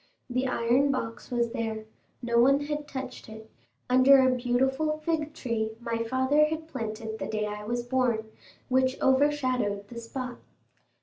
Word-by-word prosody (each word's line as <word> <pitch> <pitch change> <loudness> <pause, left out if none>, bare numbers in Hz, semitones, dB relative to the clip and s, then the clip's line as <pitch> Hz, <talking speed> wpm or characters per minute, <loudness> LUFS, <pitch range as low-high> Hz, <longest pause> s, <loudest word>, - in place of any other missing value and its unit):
The 255 +2 0
iron 250 +3 +2
box 230 -4 -3
was 235 -1 0
there—no 230 +1 -3
one 275 +4 +5
had 295 0 -4
touched 265 -4 -7
it—under 220 - +2
a 260 -1 +4
beautiful 265 +5 +1
fig 310 -2 0
tree 220 -3 -2
my 230 -1 -2
father 260 +5 +3
had 315 +1 -4
planted 220 -5 -5
the 195 - -3
day 215 0 -1
I 210 0 -5
was 240 +2 -2
born, 240 -3 0 0.4
which 260 +1 +1
overshadowed 255 -7 +1
the 235 - -7
spot. 245 +1 -6
250 Hz, 140 wpm, -28 LUFS, 225-265 Hz, 0.4 s, one